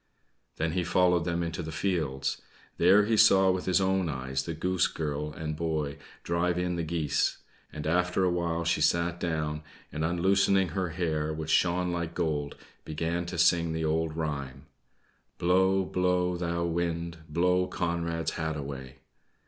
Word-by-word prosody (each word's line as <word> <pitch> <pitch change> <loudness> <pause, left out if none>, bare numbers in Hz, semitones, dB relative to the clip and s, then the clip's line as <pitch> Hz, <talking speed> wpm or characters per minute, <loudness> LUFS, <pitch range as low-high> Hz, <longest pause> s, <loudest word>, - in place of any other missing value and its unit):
Then 80 0 -1
he 90 +2 0
followed 90 -1 +2
them 85 0 -1
also - - -1
into 85 +1 -4
the 80 -1 -6
fields. 75 -7 -1 0.4
There 95 +4 +6
he 110 +1 +2
saw 95 -2 +6
with 90 0 -2
his 95 - +3
own 95 -2 +1
eyes 65 -1 -2
the 85 - -4
Goose 90 +2 +1
Girl 75 -1 -3
and 75 0 -5
boy 75 -2 -2 0.2
drive 85 +1 0
in 90 0 -1
the 85 - -2
geese; 80 -3 0 0.3
and 75 - -7
after 90 +3 +1
a 90 - +3
while 85 -1 -1
she 85 +1 +1
sat 85 0 +1
down 75 -3 -2 0.3
and, 75 +2 -3
unloosening 95 +2 +2
her 90 +2 -2
hair, 80 -3 -1
which 80 0 -4
shone 90 0 +2
like 85 -1 -3
gold, 75 -4 -1 0.3
began 85 +3 -2
to 90 - -5
sing 85 -1 +3
the 80 0 -1
old 80 0 -1
rhyme: 70 -4 -4 0.7
"Blow, 95 +2 +3
blow, 90 0 +1
thou 85 -1 -1
wind, 85 0 -2
Blow 90 +3 +2
Conrad's 85 -2 -2
hat 80 -1 -3
away." 70 -2 -7
85 Hz, 165 wpm, -28 LUFS, 80-90 Hz, 0.7 s, There